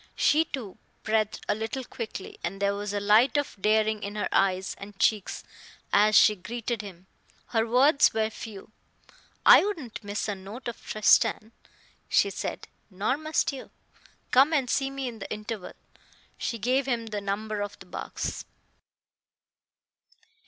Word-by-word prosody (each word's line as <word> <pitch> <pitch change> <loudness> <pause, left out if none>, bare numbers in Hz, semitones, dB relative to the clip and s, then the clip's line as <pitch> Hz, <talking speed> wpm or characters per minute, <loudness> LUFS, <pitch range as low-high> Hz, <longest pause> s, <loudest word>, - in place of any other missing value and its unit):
She, 315 +2 +3
too, 230 - -7 0.2
breathed 215 -1 0
a - - +2
little 220 +5 -4
quickly, 225 -5 -7
and 195 +2 -3
there 200 0 +1
was 205 0 -4
a 205 - -1
light 215 +8 +4
of 290 - -1
daring 215 0 +2
in 205 0 -5
her 210 - -1
eyes 190 -1 +1
and 200 0 -10
cheeks 210 +1 +1 0.5
as 210 +1 +5
she 210 - +7
greeted 230 +3 -4
him. 190 -3 -11 0.4
Her 225 -1 +1
words 275 +5 +5
were 220 0 0
few. 215 -2 -9 0.7
"I - - +9
wouldn't 315 - -5
miss 205 +2 -3
a 205 - -1
note 200 +7 -9
of 235 - -6
Tristan," 215 +1 +3 0.6
she - - +3
said, - - -5 0.2
"nor 205 +6 0
must 310 +1 0
you. 265 - -8 0.6
Come 275 +5 +5
and 275 -5 +2
see 270 -1 +1
me 275 -1 -4
in 230 -2 -7
the 195 - -8
interval." 215 -2 -5 0.6
She 235 - -3
gave 255 +5 +1
him 235 -3 -1
the 210 -2 -4
number 205 +1 -3
of 205 0 -5
the - - -14
box. 180 - -5
215 Hz, 155 wpm, -27 LUFS, 205-250 Hz, 0.7 s, I